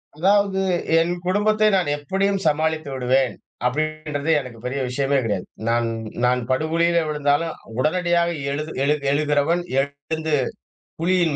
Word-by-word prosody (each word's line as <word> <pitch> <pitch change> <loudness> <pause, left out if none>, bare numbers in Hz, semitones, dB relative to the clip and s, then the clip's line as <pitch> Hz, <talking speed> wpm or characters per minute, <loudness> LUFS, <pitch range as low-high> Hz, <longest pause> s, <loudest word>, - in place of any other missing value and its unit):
அதாவது, 195 +3 +2 0.4
என் 170 +2 +1
குடும்பத்தை 215 +3 +3
நான் 180 -5 0
எப்படியும் 195 +7 0
சமாளித்து 155 0 0
விடுவேன். 130 0 +1 0.3
அப்படின்றது 155 +2 -1
எனக்கு 125 -4 -9
பெரிய 130 +2 -2
விஷயமே 135 +2 0
கிடையாது. 100 -5 -2 0.2
நான் 115 0 +2 0.4
நான் 125 0 +2
படுகுழியில 165 +5 +2
விழுந்தாலும் 150 +2 +1 0.3
உடனடியாக 170 +3 +2 0.2
எழுது 150 +2 -3
எழு 145 +2 +3 0.2
எழுகிறவன் 150 +3 +2 0.2
எழுந்து. 140 +3 -3 0.7
புவியின் 170 -2 +2
155 Hz, 115 wpm, -22 LUFS, 140-170 Hz, 0.7 s, குடும்பத்தை